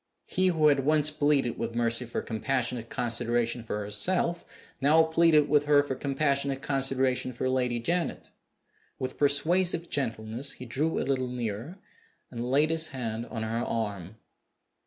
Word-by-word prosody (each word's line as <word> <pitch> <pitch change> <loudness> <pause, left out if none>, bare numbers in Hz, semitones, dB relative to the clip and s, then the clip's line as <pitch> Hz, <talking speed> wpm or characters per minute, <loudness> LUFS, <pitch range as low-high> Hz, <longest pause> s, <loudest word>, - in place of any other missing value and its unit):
He 185 0 +1
who 160 -4 +4
had 140 -1 +3
once 150 +2 +3
pleaded 145 -5 +1
with 115 0 -3
Mercy 115 +1 0
for 115 - -3
compassionate 120 0 -2
consideration 120 -1 -1
for 105 -2 -4
herself 170 - -1 0.4
now 155 +4 +5
pleaded 160 -2 +4
with 145 0 +3
her 145 -1 +5
for 145 - -3
compassionate 140 0 -1
consideration 135 -2 0
for 125 +2 -2
Lady 125 -2 0
Janet. 170 +9 -2 0.7
With 130 - -5
persuasive 170 +4 +2
gentleness 120 0 -2
he 125 - -9
drew 145 +7 -1
a - - -1
little 130 -2 0
nearer, 120 - -5 0.5
and 120 0 -4
laid 150 +4 +3
his 160 0 +3
hand 120 -3 -4
on 115 -2 -5
her 115 +2 -2
arm. 100 -4 -3
130 Hz, 150 wpm, -28 LUFS, 115-150 Hz, 0.7 s, now